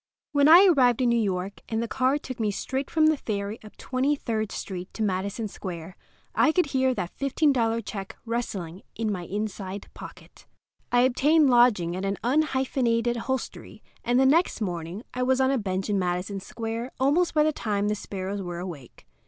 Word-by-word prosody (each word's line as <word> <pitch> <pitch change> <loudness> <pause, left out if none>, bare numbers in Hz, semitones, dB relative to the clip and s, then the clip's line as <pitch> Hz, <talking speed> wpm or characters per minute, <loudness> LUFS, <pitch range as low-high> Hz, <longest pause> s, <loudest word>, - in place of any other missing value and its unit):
When 285 -1 +4
I 350 +5 +9
arrived 260 - +4
in 245 - +3
New 235 -1 +3
York, 195 -1 -3
and 225 - -1
the - - -3
car 260 +4 +1
took 260 -4 -8
me 215 -2 +1
straight 265 +7 -3
from 315 -1 +3
the 310 -1 +4
ferry 205 -2 -4
up 215 - -14
Twenty 265 +3 0
third 220 -5 -3
Street 185 -2 -6
to 220 - -2
Madison 200 +3 -2
Square, 180 -3 -7 0.4
I 315 - +4
could 360 +2 +2
hear 260 -1 +2
that 175 - -4
$15 260 -5 +1
check 195 -3 -6
rustling 200 -7 -4
in 220 -1 -1
my 180 -3 -4
inside 200 0 -5
pocket. - - -13 0.4
I 245 - +4
obtained 275 +3 +4
lodging 220 -9 +4
at 185 - -4
an 195 0 -1
unhyphenated 255 -3 +1
hostelry, 260 +2 -5 0.2
and 245 +1 +2
the 265 - +5
next 320 +4 +3
morning 175 0 -4
I 250 - -3
was 260 +1 +2
on 265 0 +3
a 270 - +1
bench 190 -2 -2
in 205 -2 +1
Madison 180 +2 -2
Square 230 +5 -5
almost 310 +7 +2
by 300 - +5
the 310 0 +1
time 205 -4 -1
the 210 - +1
sparrows 195 -1 -5
were 175 -2 -5
awake. 170 -9 -9
230 Hz, 185 wpm, -26 LUFS, 195-265 Hz, 0.4 s, I